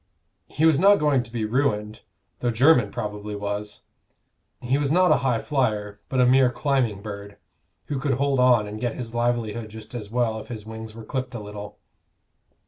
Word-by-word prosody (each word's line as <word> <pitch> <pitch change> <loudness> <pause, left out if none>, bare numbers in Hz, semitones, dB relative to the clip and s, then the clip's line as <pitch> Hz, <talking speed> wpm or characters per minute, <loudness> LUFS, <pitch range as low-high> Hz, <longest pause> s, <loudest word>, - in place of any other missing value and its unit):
He 155 - 0
was 160 -3 +5
not 200 +3 +7
going 150 -7 +2
to 120 - -11
be 115 -2 -2
ruined, 110 -3 0 0.4
though 120 - 0
Jermyn 125 +4 +4
probably 105 -2 -5
was: 105 0 -4 0.8
he 130 +3 0
was 145 -1 0
not 180 +2 +4
a - - +6
high 125 -3 +1
flyer, 105 -7 -1
but 130 - 0
a 125 - +6
mere 130 0 +5
climbing 125 -7 0
bird, 100 -1 -8 0.5
who 145 -3 -3
could 140 0 0
hold 140 0 +1
on 125 -4 +5
and 105 +1 -7
get 120 -2 -1
his 115 -2 -6
livelihood 120 -2 -1
just 110 +1 -11
as 110 -4 -6
well 115 -1 0
if - - -10
his 110 -3 -7
wings 110 0 -8
were 115 -1 -9
clipped 130 0 -4
a - - -4
little. 105 0 -8
120 Hz, 190 wpm, -24 LUFS, 105-130 Hz, 0.8 s, not